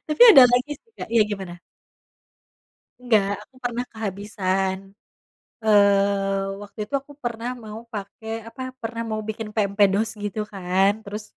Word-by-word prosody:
Tapi 305 Hz, +6 st, +3 dB
ada 265 Hz, -, +11 dB
lagi 250 Hz, +4 st, +1 dB
sih, 455 Hz, +10 st, -23 dB
Kak -, -, -6 dB
iya 230 Hz, -, +6 dB
gimana? 195 Hz, -4 st, -5 dB, 1.5 s
Nggak, 220 Hz, -5 st, +3 dB, 0.2 s
aku 260 Hz, -, -28 dB
pernah 245 Hz, 0 st, -2 dB
kehabisan 195 Hz, -3 st, -2 dB, 0.9 s
eee, 200 Hz, -2 st, +3 dB
waktu 205 Hz, +1 st, -14 dB
itu -, -, -19 dB
aku 285 Hz, -, -17 dB
pernah 235 Hz, 0 st, -3 dB
mau 215 Hz, 0 st, -8 dB
pake, 205 Hz, +1 st, -7 dB, 0.2 s
apa, 230 Hz, +3 st, -10 dB, 0.2 s
pernah 230 Hz, 0 st, -4 dB
mau 215 Hz, -, -2 dB
bikin 220 Hz, 0 st, -5 dB
pempek 200 Hz, -1 st, +3 dB
dos 220 Hz, +3 st, +1 dB
gitu 205 Hz, +1 st, -3 dB
kan, 190 Hz, +1 st, +2 dB
terus 210 Hz, +1 st, -6 dB
210 Hz, 145 wpm, -23 LUFS, 195-230 Hz, 1.5 s, ada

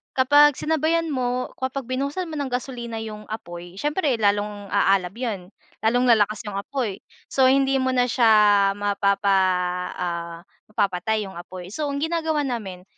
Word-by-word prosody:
kapag 290 Hz, +2 st, +5 dB
sinabayan 320 Hz, +2 st, +1 dB
mo, 250 Hz, -1 st, -2 dB
kapag 260 Hz, -1 st, -3 dB
binuhusan 280 Hz, +7 st, -2 dB
mo -, -, -5 dB
ng 270 Hz, -3 st, -3 dB
gasolina 240 Hz, -2 st, -4 dB
yung 215 Hz, -1 st, -7 dB
apoy, 175 Hz, -2 st, -8 dB
siyempre 295 Hz, -3 st, 0 dB
lalong 205 Hz, -1 st, 0 dB
aalab 195 Hz, -2 st, +2 dB
'yon, 220 Hz, -7 st, -4 dB, 0.4 s
lalong 245 Hz, +3 st, +3 dB
lalakas 215 Hz, -2 st, +3 dB
yung 200 Hz, -1 st, -4 dB
apoy. 225 Hz, -3 st, -3 dB, 0.3 s
So, 265 Hz, -1 st, +4 dB
hindi 270 Hz, 0 st, +3 dB
mo 260 Hz, 0 st, +1 dB
na 245 Hz, -, +3 dB
siya 235 Hz, -2 st, +4 dB, 0.5 s
mapapa 200 Hz, 0 st, 0 dB, 0.7 s
ah, 170 Hz, -1 st, -4 dB, 0.3 s
mapapatay 210 Hz, +1 st, 0 dB
yung 190 Hz, -, -11 dB
apoy. 180 Hz, +1 st, -9 dB
So, 300 Hz, -2 st, -2 dB
ang 280 Hz, -, -3 dB
ginagawa 320 Hz, -2 st, 0 dB
namin 195 Hz, -8 st, -5 dB
230 Hz, 150 wpm, -23 LUFS, 200-270 Hz, 0.7 s, kapag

